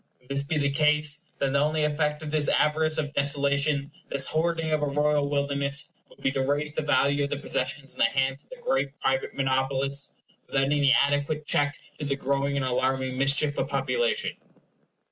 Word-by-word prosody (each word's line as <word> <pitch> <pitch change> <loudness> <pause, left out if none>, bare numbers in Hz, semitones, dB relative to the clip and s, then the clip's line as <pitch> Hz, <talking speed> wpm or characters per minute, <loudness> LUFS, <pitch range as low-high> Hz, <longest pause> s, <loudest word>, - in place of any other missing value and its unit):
If 125 - -27
this 140 0 0
be 145 +3 -2
the 140 -1 +1
case, 150 +2 +1
then 135 -1 0
the 140 - +2
only 155 +1 +1
effect 150 0 0
of 150 - -5
this 155 -2 +1
avarice 155 +1 +2
of 145 -2 -2
desolation, 140 0 0 0.2
this 135 -1 +3
hoarding 165 0 0
of 155 -1 +1
a 145 - +1
royal 145 0 +1
wilderness, 140 0 0 0.2
would - - -19
be 135 - +2
to 135 0 -1
raise 145 +3 0
the - - -1
value 145 -1 +2
of - - -5
the 145 - -2
possessions 135 0 -2
in - - -17
the - - +6
hands 135 0 0
of - - -35
the - - -9
great 145 - 0
private 135 0 -1
monopolists 135 +1 0 0.4
without 135 - +1
any 140 0 +3
adequate 145 +2 +2
cheek 145 -1 +2 0.3
to 150 - -3
the 140 -1 0
growing 140 +1 -1
and 135 - 0
alarming 130 +1 0
mischief 140 +2 +1
of - - 0
population. 475 0 0
145 Hz, 195 wpm, -26 LUFS, 140-150 Hz, 0.4 s, the